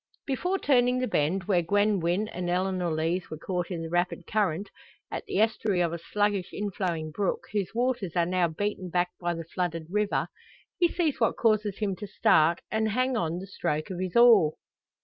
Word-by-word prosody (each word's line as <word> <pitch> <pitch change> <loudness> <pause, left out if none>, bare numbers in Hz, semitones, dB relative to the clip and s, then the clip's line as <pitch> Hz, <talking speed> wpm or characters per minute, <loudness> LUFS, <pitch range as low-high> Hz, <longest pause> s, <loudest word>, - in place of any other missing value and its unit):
Before 360 +8 -1
turning 250 -6 +3
the 255 - 0
bend, 175 +1 0
where 180 -2 +2
Gwen 205 +3 +2
Wynn 175 +5 0
and 180 -3 -4
Eleanor 180 -1 0
Lees 165 +3 -1
were 155 - -6
caught 180 +2 -3
in 170 -3 -4
the 165 - -5
rapid 175 0 0
current, 200 -3 -1 0.4
at - - -4
the - - -2
estuary 215 -3 +1
of 170 -1 0
a 170 - -4
sluggish 205 +1 0
inflowing 180 -6 -3
brook, 195 +4 -1
whose 205 0 -2
waters 240 -7 0
are 170 -1 +3
now 180 0 +2
beaten 185 +2 -3
back 175 +1 +1
by 175 -1 -1
the 165 0 -6
flooded 165 -1 -3
river, 210 0 0 0.5
he 350 - +5
sees 335 -4 -1
what 225 - +2
causes 215 -3 +2
him 200 -3 -1
to 205 - -6
start, 165 -2 +3
and 220 0 +1
hang 255 +4 +1
on 170 -5 -1
the 185 - -6
stroke 170 -4 -3
of 180 - -5
his 185 -1 -3
oar. 230 -10 +7
185 Hz, 195 wpm, -27 LUFS, 170-215 Hz, 0.5 s, oar